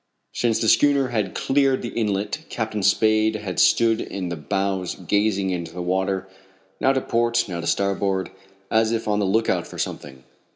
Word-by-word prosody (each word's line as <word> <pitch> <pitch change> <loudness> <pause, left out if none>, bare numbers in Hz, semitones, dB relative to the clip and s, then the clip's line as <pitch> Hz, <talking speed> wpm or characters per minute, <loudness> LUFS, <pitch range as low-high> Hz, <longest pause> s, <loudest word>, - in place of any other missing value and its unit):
Since 115 -2 +1
the 110 - +1
schooner 140 +2 +4
had 105 -5 -2
cleared 135 -1 +1
the 120 - -3
inlet 105 +7 -2
Captain 110 -2 -3
Spade 110 +2 +3
had 100 -4 -4
stood 115 -1 +4
in 95 -3 -5
the 85 - -3
bows 95 +3 -2
gazing 100 -2 0
into 85 -2 -4
the 90 - -5
water, 95 +1 -1 0.5
now 135 - +3
to 135 -1 0
port, 115 0 +1
now 85 -3 -4
to 85 - -5
starboard, 100 -1 0 0.4
as 110 0 +3
if 115 -1 -2
on 105 0 +1
the 100 - +1
lookout 110 +4 +1
for - - -10
something. 65 -2 -5
105 Hz, 175 wpm, -23 LUFS, 95-115 Hz, 0.5 s, schooner